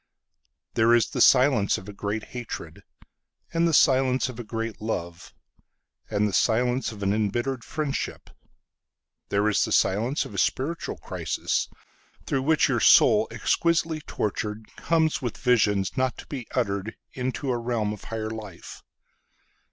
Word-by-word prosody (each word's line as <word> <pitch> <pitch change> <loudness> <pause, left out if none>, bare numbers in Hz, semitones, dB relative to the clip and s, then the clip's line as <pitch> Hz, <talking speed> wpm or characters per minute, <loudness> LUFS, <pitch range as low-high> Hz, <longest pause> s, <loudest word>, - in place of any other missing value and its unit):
There 115 +1 +4
is 120 - +1
the - - -1
silence 125 -6 +5
of 95 - -10
a 105 - -8
great 105 +2 -3
hatred, 120 -2 -7 0.7
And 165 0 +2
the - - +1
silence 130 -2 +3
of 125 -2 -9
a - - -4
great 115 0 -5
love, 85 -6 -5 0.7
And 105 0 +1
the 100 - -4
silence 125 +5 +1
of 105 -2 -8
an 100 0 +2
embittered 120 +5 -1
friendship. 150 -3 -4 1.0
There 100 +1 +1
is 105 - +2
the - - -3
silence 115 +9 +1
of - - -10
a 100 - -3
spiritual 155 - -1
crisis, - - -2 0.6
Through 135 - 0
which 155 +3 +3
your - - +1
soul, - - +6
exquisitely 165 -2 0
tortured, 105 +1 -4
Comes 160 -2 +1
with 120 -4 -4
visions 105 -6 +2
not 130 -2 0
to - - -10
be 130 -5 -6
utteredInto 125 +5 -3
a - - -1
realm 115 -3 -1
of 105 - -11
higher 110 -1 -4
life. 105 -5 -9
115 Hz, 145 wpm, -25 LUFS, 105-130 Hz, 1.0 s, soul